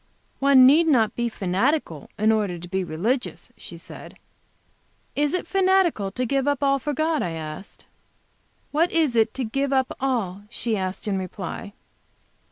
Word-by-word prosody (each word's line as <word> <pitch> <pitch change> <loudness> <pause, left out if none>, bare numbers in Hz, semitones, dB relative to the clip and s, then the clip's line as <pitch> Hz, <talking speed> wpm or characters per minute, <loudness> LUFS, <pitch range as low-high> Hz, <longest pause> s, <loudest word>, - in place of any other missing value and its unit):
"One 270 -2 +6
need 310 +6 +6
not 235 -8 +3
be 240 0 -1
fanatical 190 - -1
in 215 +2 +3
order 205 -5 0
to 175 +1 -9
be 190 +1 -2
religious," 215 - -3
she - - -10
said. - - -12 1.0
"Is 290 0 +1
it 365 - -2
fanatical 375 - +2
to 255 - -2
give 275 +2 0
up 285 -1 0
all 275 0 +3
for 295 +3 -3
God?" 310 +2 0
I 170 - -2
asked. 160 +4 -8 0.9
"What 325 +4 +2
is 310 -7 +1
it 225 -1 +2
to 265 - -2
give 275 +5 -1
up 265 -1 +1
all?" 225 -8 -1
she 235 -1 -2
asked, 190 +1 -4
in 195 -2 0
reply. 190 +2 -6
240 Hz, 165 wpm, -24 LUFS, 195-280 Hz, 1.0 s, One